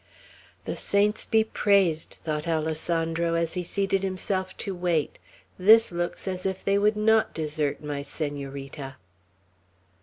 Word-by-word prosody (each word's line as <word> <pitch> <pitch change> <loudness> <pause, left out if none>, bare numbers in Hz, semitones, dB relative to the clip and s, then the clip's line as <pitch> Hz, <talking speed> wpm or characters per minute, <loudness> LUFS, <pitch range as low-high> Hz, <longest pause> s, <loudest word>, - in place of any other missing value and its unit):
"The - - -3
saints 205 +1 +1
be 220 -1 +4
praised!" 195 -7 +2
thought 155 0 -3
Alessandro, 165 +1 0
as 165 -1 0
he 180 - -1
seated 195 +2 0
himself 185 0 -2
to 200 - -3
wait. 175 -4 -1 0.4
"This 220 +4 +6
looks 175 +2 -3
as 185 -1 -3
if 190 -1 -3
they 200 0 +3
would 210 +1 +2
not 220 +1 +3
desert 150 -2 -2
my 145 -1 -3
Senorita." 140 -1 -5
175 Hz, 130 wpm, -26 LUFS, 155-195 Hz, 0.4 s, This